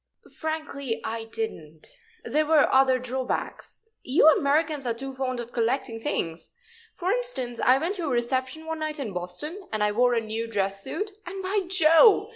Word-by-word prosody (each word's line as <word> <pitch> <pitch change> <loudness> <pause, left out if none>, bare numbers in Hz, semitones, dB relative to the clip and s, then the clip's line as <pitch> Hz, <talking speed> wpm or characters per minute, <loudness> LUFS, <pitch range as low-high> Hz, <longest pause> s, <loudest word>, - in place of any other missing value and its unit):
"Frankly, 305 -6 -3
I 225 0 -4
didn't. 160 - -6 0.3
There 305 0 0
were 315 -2 +5
other 265 -1 +5
drawbacks. 255 - -4
You 275 +4 +4
Americans 295 -1 +1
are 230 - 0
too 270 +3 -6
fond 260 -1 -3
of 240 0 -6
collecting 235 0 -1
things. 170 - -3 0.5
For 365 +1 -1
instance, 410 - -3
I 255 +1 +6
went 330 +7 -1
to 345 - -3
a - - -1
reception 260 +5 -1
one 320 0 -4
night 310 0 -3
in 245 -9 -4
Boston, 240 - -6
and 215 -1 0
I 210 - +2
wore 245 +3 +3
a - - +3
new 225 +1 -4
dress 195 -2 -1
suit, 410 - -3 0.2
and, 385 +1 -6
by 385 +1 0
Jove! 365 +5 +6
265 Hz, 175 wpm, -26 LUFS, 230-320 Hz, 0.5 s, I